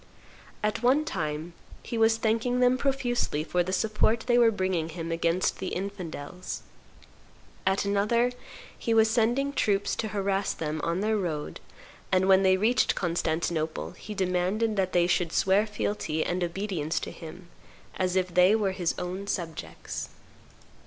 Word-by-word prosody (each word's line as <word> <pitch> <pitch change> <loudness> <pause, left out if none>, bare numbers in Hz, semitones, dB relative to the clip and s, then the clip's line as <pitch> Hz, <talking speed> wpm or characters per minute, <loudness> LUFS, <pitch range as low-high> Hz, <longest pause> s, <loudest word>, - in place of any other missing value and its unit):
At 215 +1 0
one 265 +5 +3
time 160 - -3 0.3
he - - -5
was 225 0 +4
thanking 230 +3 +1
them 250 0 +4
profusely 255 - 0
for 180 +2 0
the 180 +2 -2
support 215 +3 +1
they 240 +1 +3
were 235 -1 +6
bringing 185 -6 -1
him 165 0 -5
against 165 +2 0
the 190 - -3
infidels; 180 -3 -5 1.0
at 190 +1 +2
another 215 +5 +2 0.4
he 230 - -1
was 220 0 +5
sending 245 +5 +1
troops 205 -6 +1
to 220 - -1
harass 200 -1 -1
them 155 -1 -3
on 170 +3 0
their 215 +1 +1
road, 160 -6 -3 0.5
and, 190 0 +3
when 190 0 +6
they 190 -1 +4
reached 225 +6 +2
Constantinople, 165 -2 -1
he 215 - -9
demanded 190 +4 0
that 190 -2 0
they 175 -1 +4
should 175 -1 +1
swear 195 +5 +3
fealty 205 -6 -2
and 180 +1 -1
obedience 175 -3 -2
to - - -5
him, 170 +2 -11 0.5
as 185 -1 0
if 185 -1 0
they 180 +4 +6
were 205 -3 +1
his 180 -3 -1
own 185 +3 -4
subjects. 165 -6 -5
190 Hz, 150 wpm, -27 LUFS, 175-220 Hz, 1.0 s, were